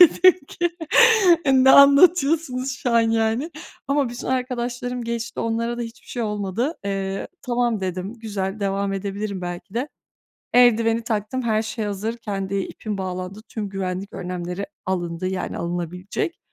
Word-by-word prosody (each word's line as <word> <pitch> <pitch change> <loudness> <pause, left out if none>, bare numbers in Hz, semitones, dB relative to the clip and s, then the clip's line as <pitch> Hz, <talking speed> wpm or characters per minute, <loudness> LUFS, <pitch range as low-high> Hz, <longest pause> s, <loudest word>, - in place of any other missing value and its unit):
Dedim 360 0 +7
ki, 345 -1 -1 0.8
eee, 270 - +4
ne 265 - +8
anlatıyorsunuz 280 -2 +5
şu 250 - -2
an 235 - +5
yani, 225 +6 +1 0.4
ama 280 -2 +2
bütün 240 0 -7
arkadaşlarım 245 -1 -2
geçti, 235 0 -4
onlara 230 +1 -1
da - - -2
hiçbir 230 +1 -9
şey 240 - -3
olmadı. 210 - -2
Eee, 195 -1 -3
tamam, 240 -3 0
dedim, 185 +3 -4
güzel, 205 -3 -4
devam 195 0 -1
edebilirim 200 0 -3
belki 175 +3 -6
de. 255 +5 -1 0.7
Eldiveni 230 -2 +5
taktım, 225 +3 -2
her 220 -2 +1
şey 220 0 -4
hazır, 210 +3 -3
kendi 200 -3 -4
ipim 200 +1 -4
bağlandı, 185 +2 -5
tüm 210 -3 -5
güvenlik 190 0 -4
önlemleri 180 +1 -4 0.2
alındı, 175 -1 -2
yani 190 -1 -3
alınabilecek. 175 - -3
220 Hz, 140 wpm, -23 LUFS, 195-245 Hz, 0.8 s, ne